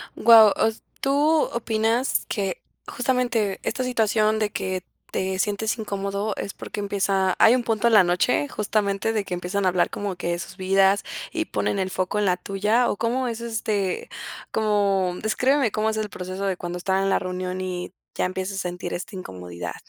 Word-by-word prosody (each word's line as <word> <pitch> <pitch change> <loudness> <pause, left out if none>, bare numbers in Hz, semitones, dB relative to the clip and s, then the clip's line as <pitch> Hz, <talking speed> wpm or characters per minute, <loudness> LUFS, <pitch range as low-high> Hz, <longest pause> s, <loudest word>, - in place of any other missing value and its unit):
Guau. 225 -3 +8
O - - +5
s 220 - -10 0.2
tú 275 - 0 0.5
opinas 225 +2 0
que, 195 -4 -2 0.3
justamente, 245 -5 0
esta 255 - -1
situación 220 -3 +2
de 210 -1 0
que 185 -1 -3 0.3
te 190 0 -1
sientes 215 +3 0
incómodo, 200 0 -2
es 200 - -4
porque - - -7
empieza 195 -2 +1
hay 225 - +7
un 245 - 0
punto 225 -1 0
en 230 - +3
la 205 -3 +8
noche, 180 +11 +1
justamente, 210 -1 0
de 210 -2 0
que 180 - -5
empiezan 185 +3 -2
a - - +5
hablar 180 0 +2
como 200 -2 -3
que 175 -1 -4
de 170 0 -1
sus 170 - -8
vidas 195 +1 +3 0.3
y - - -1
ponen 200 - -1
el 190 0 -1
foco 185 +2 -1
en 205 - +1
la 180 -1 +2
tuya, 210 +6 +1
o - - -2
cómo 250 +2 0
es 230 0 -4
este 215 -5 -2 0.4
como 200 -4 +1
descríbeme 255 +2 +2
cómo 215 +1 0
es 220 - -2
el 215 -1 -2
proceso 185 +1 -5
de 190 -2 0
cuando 175 0 -5
están 190 +2 0
en 195 - +1
la - - +3
reunión 185 0 -4
y 180 -1 -4 0.2
ya - - 0
empiezas 190 +1 -3
a - - -1
sentir 180 0 -4
esta 185 +3 -6
incomodidad. 90 - -7
200 Hz, 195 wpm, -24 LUFS, 185-220 Hz, 0.5 s, Guau